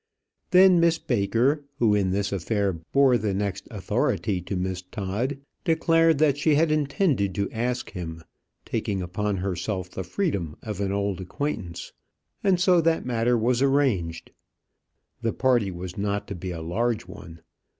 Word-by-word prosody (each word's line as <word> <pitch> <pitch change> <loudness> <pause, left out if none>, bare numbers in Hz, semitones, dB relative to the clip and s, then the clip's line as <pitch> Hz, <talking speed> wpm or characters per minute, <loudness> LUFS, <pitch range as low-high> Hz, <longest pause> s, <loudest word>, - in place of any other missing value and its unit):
Then 185 -1 +7
Miss 170 -1 +4
Baker, 125 +5 +1
who 115 -5 +3
in 100 -2 +2
this 100 +1 -1
affair 100 +1 0
bore 125 +10 +2
the 105 -2 -1
next 100 -1 -3
authority 95 -3 -1
to 95 +3 -4
Miss 90 0 -2
Todd, 105 +8 -3 0.3
declared 165 -2 +3
that 145 -1 +3
she 150 0 +3
had 160 +1 +3
intended 145 - +1
to 100 -1 0
ask 120 +1 -2
him, 80 -3 -6 0.4
taking 95 -3 -2
upon 100 +3 -2
herself 95 0 -3
the 95 - -5
freedom 90 - -2
of 105 -3 -4
an 100 -1 0
old 100 -1 -1
acquaintance; 95 - -4 0.5
and 190 -3 +3
so 180 -1 +4
that 165 0 +1
matter 120 0 +1
was 120 +2 +1
arranged. 130 - +1 0.9
The 115 - 0
party 125 -6 +2
was 90 +1 -7
not 100 0 -1
to - - -3
be 90 +2 -6
a 85 -2 -5
large 115 +7 -1
one. 80 0 -11
105 Hz, 155 wpm, -25 LUFS, 95-140 Hz, 0.9 s, Then